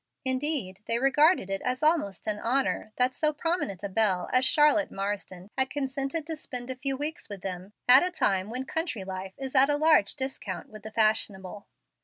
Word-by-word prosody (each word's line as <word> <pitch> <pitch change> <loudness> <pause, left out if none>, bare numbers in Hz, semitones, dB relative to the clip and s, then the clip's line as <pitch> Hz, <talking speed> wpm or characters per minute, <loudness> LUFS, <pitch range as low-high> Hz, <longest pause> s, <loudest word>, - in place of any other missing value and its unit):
Indeed, 260 -7 -1
they 230 - +1
regarded 275 - +3
it 195 - -2
as 255 +3 -2
almost 300 - +1
an 210 -1 0
honor 245 -2 -1
that 250 +1 +2
so 305 +3 +1
prominent 300 - -2
a - - -1
belle 190 -3 0
as 255 0 +4
Charlotte 300 +1 +4
Marsden 195 -1 -5
had 265 0 +1
consented 275 +3 -3
to 320 0 -4
spend 250 -4 -5
a - - -5
few 270 +1 -1
weeks 295 -4 -3
with 200 -3 -7
them 185 +1 -6
at 255 +2 +9
a 360 - 0
time 195 - 0
when 255 +3 -4
country 315 - -3
life 190 0 -7
is 265 -1 -6
at 270 +1 +6
a 290 - +2
large 305 -9 +4
discount 260 -8 -5
with 215 0 -12
the 220 - -8
fashionable. 210 -3 0
255 Hz, 195 wpm, -27 LUFS, 200-290 Hz, -, at